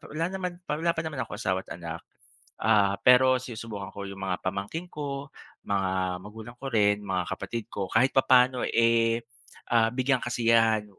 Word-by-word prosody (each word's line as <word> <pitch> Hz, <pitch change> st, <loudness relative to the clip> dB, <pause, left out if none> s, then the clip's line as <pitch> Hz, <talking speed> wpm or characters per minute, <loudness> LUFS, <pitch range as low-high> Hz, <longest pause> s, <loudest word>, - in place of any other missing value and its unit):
wala 165 Hz, -, 0 dB
naman, 185 Hz, -2 st, -3 dB
wala 165 Hz, +2 st, -1 dB
pa 165 Hz, -, -2 dB
naman 155 Hz, -4 st, -5 dB
akong 115 Hz, -4 st, -4 dB
asawa 95 Hz, -4 st, -1 dB
at -, -, -6 dB
anak, 85 Hz, -1 st, -6 dB, 0.6 s
ah, 100 Hz, -3 st, +3 dB
pero 130 Hz, +1 st, +6 dB
sinusubukan 110 Hz, -5 st, -7 dB
ko 100 Hz, -, -7 dB
yung 100 Hz, 0 st, -9 dB
mga 95 Hz, -2 st, -2 dB
pamangkin 100 Hz, -, -4 dB
ko, 140 Hz, -1 st, -5 dB, 0.4 s
mga 95 Hz, -2 st, -1 dB
magulang 110 Hz, +4 st, -10 dB
ko 135 Hz, -, -6 dB
rin, 105 Hz, -1 st, +3 dB
mga 95 Hz, -2 st, -1 dB
kapatid 115 Hz, -2 st, -5 dB
ko 95 Hz, -2 st, -3 dB
kahit 125 Hz, +4 st, +3 dB
papaano 130 Hz, -1 st, +5 dB
eh, 115 Hz, 0 st, +3 dB, 0.5 s
ah, 115 Hz, -1 st, +5 dB
bigyang 130 Hz, 0 st, +1 dB
kasiyahan, 115 Hz, -2 st, +3 dB
115 Hz, 165 wpm, -27 LUFS, 100-130 Hz, 0.6 s, pero